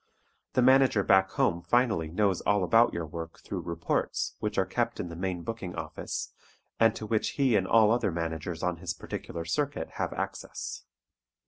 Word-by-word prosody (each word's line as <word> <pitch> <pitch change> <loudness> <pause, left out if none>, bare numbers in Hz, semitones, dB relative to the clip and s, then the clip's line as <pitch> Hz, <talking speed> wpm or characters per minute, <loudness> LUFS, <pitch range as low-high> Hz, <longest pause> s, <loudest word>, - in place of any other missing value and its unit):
The 125 - +3
manager 130 -5 +5
back 95 0 +4
home 85 -2 +1
finally 110 -2 +2
knows 95 +2 +1
all 105 0 +2
about 115 +6 +5
your 85 -1 -3
work 80 +1 -7
through - - -5
"reports" 85 -1 -1
which - - -3
are - - +3
kept - - -1
in 85 - -3
the 85 - -7
main 90 -1 -3
booking 110 -5 -5
office 80 -2 -5 0.5
and 115 -1 +5
to 110 - -5
which 110 0 0
he 135 -5 +3
and 95 -2 +2
all 110 0 +5
other 120 -3 +2
managers 80 0 -4
on 90 -1 0
his 85 -1 -4
particular 85 0 -6
circuit 140 - -1
have - - -1
access. - - -5
95 Hz, 180 wpm, -29 LUFS, 85-115 Hz, 0.5 s, manager